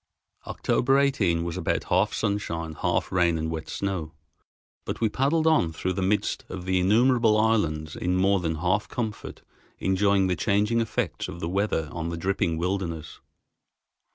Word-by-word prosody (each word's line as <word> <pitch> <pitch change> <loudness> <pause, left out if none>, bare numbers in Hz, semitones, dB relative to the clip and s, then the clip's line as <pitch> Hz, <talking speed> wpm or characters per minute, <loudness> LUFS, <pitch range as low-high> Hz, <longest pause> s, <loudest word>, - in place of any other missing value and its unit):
October 135 +2 +1
18 100 -12 +2
was 85 -1 -4
about - - -1
half 95 +4 +2
sunshine, 85 -7 -2
half - - 0
rain 85 -2 +2
and 80 0 -2
wet 80 -1 -5
snow, 90 -5 -3 0.7
but - - -5
we 115 - +2
paddled 145 +8 +1
on 155 - +3
through 95 +4 -2
the 95 - -3
midst 100 +3 0
of 95 -1 -6
the 95 0 +1
innumerable 115 +3 +4
islands 80 -9 +1
in 90 +1 -1
more 95 +1 +3
than 80 -2 -2
half 90 +6 0
comfort, 110 -4 -5 0.3
enjoying 95 +1 +2
the 90 -1 +1
changing 105 +7 +1
effects 115 -7 -2
of - - -8
the 80 - -3
weather 95 -3 0
on 80 0 -4
the 85 - -4
dripping 85 -2 0
wilderness. 85 -3 -3
95 Hz, 160 wpm, -26 LUFS, 85-105 Hz, 0.7 s, innumerable